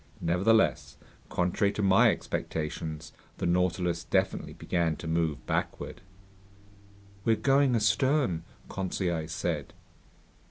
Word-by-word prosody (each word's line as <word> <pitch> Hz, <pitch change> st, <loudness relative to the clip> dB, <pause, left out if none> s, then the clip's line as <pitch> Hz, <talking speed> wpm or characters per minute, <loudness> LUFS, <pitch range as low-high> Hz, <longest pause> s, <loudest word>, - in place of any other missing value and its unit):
Nevertheless, 95 Hz, +7 st, +2 dB, 0.3 s
contrary 90 Hz, +3 st, +1 dB
to 105 Hz, -, -2 dB
my 95 Hz, 0 st, +6 dB
expectations, 80 Hz, -1 st, -4 dB, 0.2 s
the -, -, -3 dB
Nautilus 90 Hz, -1 st, +1 dB
definitely -, -, 0 dB
began 85 Hz, -3 st, -1 dB
to 80 Hz, -, -8 dB
move 80 Hz, -2 st, -1 dB
backward. -, -, -3 dB, 1.2 s
"We're 115 Hz, -, +3 dB
going 135 Hz, 0 st, +3 dB
astern?" 115 Hz, -, +2 dB, 0.3 s
Conseil 90 Hz, -4 st, -2 dB
said. 85 Hz, -, -3 dB
90 Hz, 95 wpm, -29 LUFS, 85-105 Hz, 1.2 s, my